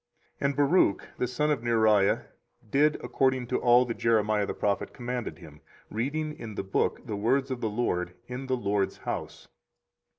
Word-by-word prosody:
24:036:008 -, -, 0 dB
And 140 Hz, -, -2 dB
Baruch 145 Hz, -, +3 dB
the 125 Hz, -, +1 dB
son 150 Hz, +5 st, 0 dB
of 140 Hz, -6 st, 0 dB
Neriah 110 Hz, -4 st, +3 dB, 0.5 s
did 150 Hz, +2 st, +4 dB
according 130 Hz, -2 st, +1 dB
to -, -, -1 dB
all 120 Hz, +1 st, +5 dB
that 115 Hz, -, -5 dB
Jeremiah 110 Hz, -2 st, +2 dB
the -, -, -3 dB
prophet 100 Hz, -1 st, -1 dB
commanded 125 Hz, -1 st, -4 dB
him, 80 Hz, -4 st, -14 dB, 0.3 s
reading 150 Hz, +8 st, -2 dB
in 115 Hz, -7 st, -8 dB
the -, -, -3 dB
book 95 Hz, -, -1 dB
the 105 Hz, -, -3 dB
words 130 Hz, +6 st, +1 dB
of 125 Hz, -2 st, -3 dB
the 110 Hz, -, 0 dB
LORD 90 Hz, -6 st, -1 dB
in 125 Hz, +2 st, -6 dB
the 130 Hz, -1 st, +1 dB
LORD's 100 Hz, -3 st, 0 dB
house. -, -, -5 dB
120 Hz, 175 wpm, -28 LUFS, 105-130 Hz, 0.5 s, all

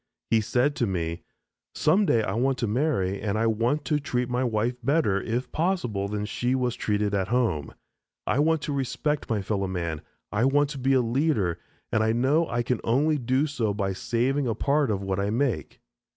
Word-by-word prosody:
He 115 Hz, -1 st, +4 dB
said 125 Hz, +6 st, +1 dB
to 120 Hz, -, +1 dB
me, 85 Hz, -3 st, -2 dB, 0.5 s
"some 190 Hz, +6 st, +3 dB
day 115 Hz, -2 st, +3 dB
I 95 Hz, -, -2 dB
want 130 Hz, +4 st, +1 dB
to 125 Hz, -, -1 dB
marry 105 Hz, -6 st, 0 dB
and 105 Hz, -1 st, -1 dB
I 115 Hz, -, +1 dB
want 115 Hz, +7 st, +1 dB
to 150 Hz, +3 st, +1 dB
treat 125 Hz, -3 st, -2 dB
my 125 Hz, +1 st, 0 dB
wife 115 Hz, 0 st, 0 dB
better, 125 Hz, -7 st, +2 dB
if 120 Hz, +5 st, -3 dB
possible, 155 Hz, -, -1 dB
than 105 Hz, 0 st, -3 dB
she 120 Hz, +4 st, -1 dB
was 125 Hz, -2 st, 0 dB
treated 105 Hz, -1 st, -1 dB
at 95 Hz, -2 st, 0 dB
home. 110 Hz, -, 0 dB, 0.5 s
I 110 Hz, +6 st, +1 dB
want 160 Hz, 0 st, +2 dB
to 145 Hz, -, -2 dB
respect 140 Hz, +2 st, -2 dB
my 105 Hz, -4 st, 0 dB
fellow 100 Hz, -1 st, -1 dB
man, 85 Hz, -4 st, -3 dB, 0.3 s
I 105 Hz, +4 st, +1 dB
want 145 Hz, +1 st, +3 dB
to 140 Hz, -, -6 dB
be 135 Hz, +1 st, +2 dB
a 130 Hz, -, +4 dB
leader, 115 Hz, -, 0 dB, 0.3 s
and 110 Hz, -, +2 dB
I 110 Hz, 0 st, +2 dB
know 140 Hz, +8 st, +2 dB
I 120 Hz, 0 st, -1 dB
can 125 Hz, 0 st, -1 dB
only 145 Hz, +6 st, +2 dB
do 130 Hz, +4 st, +1 dB
so 120 Hz, -9 st, -1 dB
by 100 Hz, -2 st, -1 dB
saving 125 Hz, +7 st, 0 dB
a 115 Hz, -, 0 dB
part 145 Hz, -1 st, +1 dB
of 100 Hz, -2 st, -1 dB
what 95 Hz, 0 st, -1 dB
I 100 Hz, +1 st, 0 dB
make." 115 Hz, -, -1 dB
120 Hz, 205 wpm, -26 LUFS, 105-140 Hz, 0.5 s, He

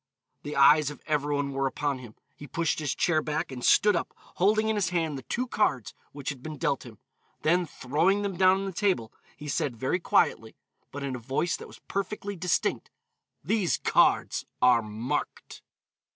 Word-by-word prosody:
The 145 Hz, -, -6 dB
eyes 145 Hz, +1 st, +6 dB
of 150 Hz, -, -9 dB
every 145 Hz, -1 st, 0 dB
one 145 Hz, -1 st, -1 dB
were 135 Hz, 0 st, 0 dB
upon 140 Hz, 0 st, -2 dB
him. 120 Hz, -4 st, -12 dB, 0.2 s
He 145 Hz, -, -10 dB
pushed 165 Hz, +3 st, -1 dB
his 150 Hz, -3 st, -2 dB
chair 160 Hz, -3 st, +2 dB
back, 150 Hz, -2 st, -3 dB
and 125 Hz, -2 st, -7 dB
stood 210 Hz, -2 st, +5 dB
up, 170 Hz, -, -3 dB, 0.2 s
holding 215 Hz, +4 st, +3 dB
in 220 Hz, -, +1 dB
his 195 Hz, -4 st, +1 dB
hand 165 Hz, -4 st, -1 dB
the 135 Hz, -, -6 dB
two 240 Hz, -, -2 dB
cards 130 Hz, -, 0 dB, 0.2 s
which 140 Hz, -2 st, -5 dB
had 140 Hz, -4 st, -6 dB
been 155 Hz, +1 st, -7 dB
dealt 135 Hz, -1 st, -1 dB
him, 110 Hz, -3 st, -13 dB, 0.5 s
then 175 Hz, +2 st, +2 dB
throwing 170 Hz, +11 st, +1 dB
them 200 Hz, -2 st, -2 dB
down 185 Hz, +1 st, +5 dB
on -, -, -3 dB
the 195 Hz, -, -3 dB
table, 180 Hz, -, 0 dB, 0.2 s
he 150 Hz, -, -9 dB
said 135 Hz, -3 st, -1 dB
very 130 Hz, +9 st, 0 dB
quietly, 110 Hz, -9 st, +1 dB, 0.4 s
but 145 Hz, 0 st, -6 dB
in 135 Hz, -2 st, -3 dB
a -, -, -6 dB
voice 135 Hz, +8 st, -1 dB
that -, -, -9 dB
was -, -, -14 dB
perfectly 200 Hz, +1 st, -3 dB
distinct, 180 Hz, -1 st, -1 dB, 0.5 s
"These 195 Hz, +2 st, +1 dB
cards -, -, +2 dB, 0.2 s
are 125 Hz, -2 st, +5 dB
marked." 110 Hz, +3 st, -4 dB
150 Hz, 190 wpm, -27 LUFS, 135-185 Hz, 0.5 s, eyes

